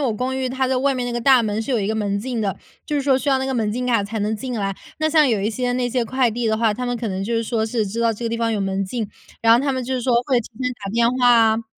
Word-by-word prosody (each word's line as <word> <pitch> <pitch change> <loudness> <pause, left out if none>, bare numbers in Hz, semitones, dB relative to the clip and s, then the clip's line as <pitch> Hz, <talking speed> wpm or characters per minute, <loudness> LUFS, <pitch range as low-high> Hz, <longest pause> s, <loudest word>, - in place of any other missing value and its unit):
我 230 - 0
公 255 +4 -2
寓 260 -1 -1
它 260 +1 -1
在 260 - +1
外 270 +2 +1
面 250 -1 -2
那 245 - -3
个 240 - -2
大 260 0 +5
门 215 -1 -1
是 245 +4 -3
有 235 - +1
一 200 - -1
个 220 - -1
门 205 -2 -1
禁 235 +3 -3
的， 200 -3 -1 0.3
就 300 - -3
是 285 - +1
说 270 -1 +3
需 285 - -3
要 270 - +3
那 - - -1
个 265 - -2
门 220 -4 0
禁 250 +2 -2
卡 230 -5 +2
才 215 +2 -4
能 210 +2 -1
进 250 +3 -5
来。 195 -1 -1 0.3
那 310 0 +1
像 305 -3 +5
有 220 -4 +1
一 205 +3 0
些 245 +2 -1
那 245 0 0
些 245 -1 0
快 255 +1 +1
递 235 +1 -2
的 220 0 +1
话， 225 -1 +2
他 250 +4 -4
们 245 0 -1
可 230 -1 -3
能 190 -1 -3
就 230 +3 -2
是 230 - +1
说 225 -1 -1
是 220 -1 -1
知 210 +4 -4
道 230 -1 +2
这 230 +3 -7
个 230 - 0
地 230 - -2
方 230 0 0
有 210 - -1
门 195 0 -1
禁， 220 +2 -3 0.3
然 225 0 +5
后 230 - +6
他 275 0 0
们 260 -1 -2
就 255 +2 -4
是 255 - -1
说 245 0 +1
会 260 -3 +4
提 220 - -9 0.2
前 250 - 0
打 205 -3 -8
电 235 0 +3
话 250 0 +2
啊。 230 -1 +4
235 Hz, 375 characters per minute, -21 LUFS, 220-255 Hz, 0.3 s, 后